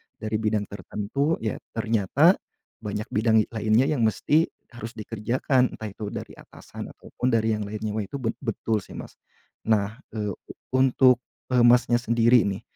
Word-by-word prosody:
Dari 110 0 -3
bidang 110 -1 0
tertentu 105 - -2
ya 110 - -2 0.2
ternyata 115 - +3 0.4
banyak 105 0 -5
bidang 110 +1 +3
i - - -2
lainnya 110 +3 +2
yang 130 -7 +2
mesti 145 - +2 0.2
harus 120 -1 -8
dikerjakan, 120 +4 0
entah 110 - -6
itu 105 +1 -7
dari - - -7
atasan - - -10
ataupun 125 - -3
dari 110 -1 +2
yang 105 - -4
lainnya. 110 +1 -4
Wah 105 - -1
itu 120 - -9
bet 115 -1 -2
betul 115 -3 -1
sih - - -13
Mas. - - -9 0.5
Nah, 110 0 +1 0.2
eee, 105 -2 -2
u 100 - -9 0.2
untuk 130 -1 +5 0.3
e 125 - +2
Masnya 120 0 +5
sendiri 115 -1 +4
nih, 95 -1 -2
110 Hz, 165 wpm, -25 LUFS, 105-125 Hz, 0.5 s, untuk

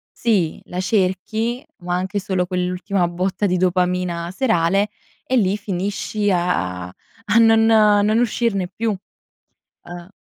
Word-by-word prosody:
sì, 195 -9 0
la 180 - -5
cerchi, 215 +6 -1
ma 175 -2 -3
anche 190 +3 -2
solo 185 -2 -1
quell'ultima 180 +1 -1
botta 185 +4 -2
di 180 -1 +1
dopamina 180 -1 0
serale, 195 -3 +1 0.4
e 260 - +1
lì 195 -2 +2
finisci 205 +1 -2
a 95 - -1
a 215 - -4
non 225 -1 +5
non 215 0 +4
uscirne 220 -5 0
più. 220 +4 -2 0.9
Eh. 175 +1 -10
190 Hz, 125 wpm, -20 LUFS, 180-215 Hz, 0.9 s, non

